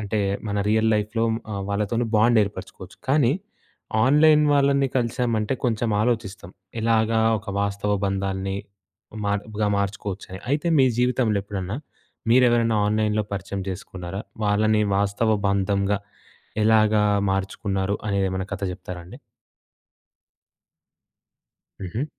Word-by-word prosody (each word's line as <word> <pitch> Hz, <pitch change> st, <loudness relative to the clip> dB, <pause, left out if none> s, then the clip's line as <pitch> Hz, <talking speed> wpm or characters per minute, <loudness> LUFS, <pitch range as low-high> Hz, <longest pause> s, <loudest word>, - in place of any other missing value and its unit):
అంటే 105 Hz, 0 st, -1 dB, 0.3 s
మన 100 Hz, 0 st, -1 dB
రియల్ 110 Hz, +1 st, +3 dB
లైఫ్‍లో 110 Hz, +2 st, 0 dB, 0.3 s
ఆహ్, 100 Hz, -, -3 dB
వాళ్ళతోని 105 Hz, +4 st, 0 dB
బాండ్ 115 Hz, +1 st, +4 dB
ఏర్పరుచుకోవచ్చు. 95 Hz, -1 st, -9 dB
కానీ 135 Hz, -2 st, +4 dB, 0.7 s
ఆన్‍లైన్ 150 Hz, +3 st, +5 dB
వాళ్ళని 140 Hz, -1 st, +3 dB
కలిసామంటే 120 Hz, -1 st, 0 dB
కొంచెం 115 Hz, -1 st, 0 dB
ఆలోచిస్తం. 110 Hz, -6 st, -2 dB, 0.3 s
ఎలాగా 110 Hz, 0 st, +2 dB, 0.2 s
ఒక 105 Hz, -, -15 dB
వాస్తవ 100 Hz, 0 st, -1 dB
బంధాన్ని 95 Hz, 0 st, -2 dB, 0.7 s
మార్గ 105 Hz, +1 st, -2 dB
మార్చుకోవచ్చని. 100 Hz, -1 st, -4 dB
అయితే 150 Hz, +4 st, +1 dB
మీ 130 Hz, -, +6 dB
జీవితంలో 125 Hz, -4 st, +2 dB
ఎప్పుడన్నా 100 Hz, 0 st, -4 dB, 0.5 s
మీరు 125 Hz, +2 st, +6 dB
ఎవరైనా 115 Hz, -2 st, +2 dB
ఆన్‍లైన్‍లో 105 Hz, 0 st, +1 dB
పరిచయం 100 Hz, 0 st, -4 dB
చేసుకున్నరా? 95 Hz, +1 st, -6 dB, 0.2 s
వాళ్ళని 105 Hz, +1 st, +2 dB
వాస్తవ 100 Hz, +2 st, +1 dB
బంధంగా 100 Hz, +1 st, +1 dB, 0.7 s
ఎలాగా 110 Hz, -1 st, +4 dB, 0.3 s
మార్చుకున్నరు 95 Hz, 0 st, -2 dB
అనేది 100 Hz, -1 st, +1 dB
ఏమన్నా 95 Hz, +1 st, -3 dB
కథ -, -, -9 dB
చెప్తారా 90 Hz, -1 st, -8 dB
అండి? 95 Hz, +9 st, -12 dB, 2.6 s
హుహు. 110 Hz, +9 st, -3 dB
105 Hz, 110 wpm, -24 LUFS, 100-115 Hz, 2.6 s, మీ